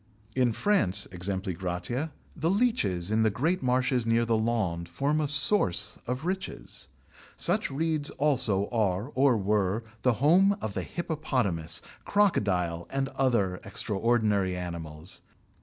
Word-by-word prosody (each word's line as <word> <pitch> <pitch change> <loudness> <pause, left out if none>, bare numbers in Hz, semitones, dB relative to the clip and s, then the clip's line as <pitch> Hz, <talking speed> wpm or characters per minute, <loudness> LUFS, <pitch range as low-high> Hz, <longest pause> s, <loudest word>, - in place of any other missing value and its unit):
In 125 -2 +2
France, 105 - +2
e.g., 90 +2 -2
the 95 - -3
leeches 180 - +1
in 110 +1 +2
the 110 - +4
great 155 - 0
marshes 130 -1 +1
near 115 +1 +2
the 115 -1 +1
Landes 110 -7 -1
form 145 - 0
a 150 - 0
source 140 - +3
of 125 +5 -3
riches. 185 - -5 0.5
Such - - +2
reeds 155 +1 0
also 120 -9 +1
are 105 +1 -1
or 130 -3 +3
were 105 +1 0 0.2
the 125 - +3
home 180 - +4
of 110 - -4
the - - -2
hippopotamus, 130 - -2 0.2
crocodile, 90 - +1
and 135 0 -2
other 115 -10 0
extraordinary 105 -4 0
animals. 85 -1 -5
115 Hz, 125 wpm, -28 LUFS, 95-145 Hz, 0.5 s, the